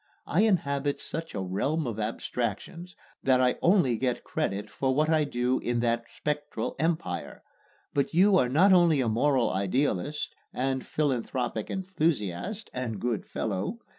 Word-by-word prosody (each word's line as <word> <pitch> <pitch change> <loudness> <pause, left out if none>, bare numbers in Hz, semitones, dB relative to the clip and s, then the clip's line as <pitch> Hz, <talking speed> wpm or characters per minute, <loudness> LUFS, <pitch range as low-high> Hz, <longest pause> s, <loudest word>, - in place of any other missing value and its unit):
I 170 - +2
inhabit 145 -9 +1
such 165 -3 -6
a 100 - -2
realm 140 - -1
of 115 -3 -4
abstractions 120 - -3 0.3
that 130 -1 +3
I 125 -1 +2
only 170 - +4
get 125 -2 -1
credit 100 +2 -2
for 130 +5 -1
what 155 +2 +2
I 155 -2 +3
do 125 -1 0
in 120 -1 -1
that 115 0 0
spectral 150 0 -3
empire; 160 0 -2 0.5
but 140 -1 +1
you 190 +4 +5
are 125 - +2
not 185 +9 +5
only 170 -5 +5
a 125 - +1
moral 125 +3 +2
idealist 125 +7 -1 0.2
and 130 0 -1
philanthropic 125 -5 -1
enthusiast 180 - -2
(and 120 -5 -3
good 120 -2 -2
fellow!) 105 - -2
135 Hz, 145 wpm, -28 LUFS, 115-160 Hz, 0.5 s, you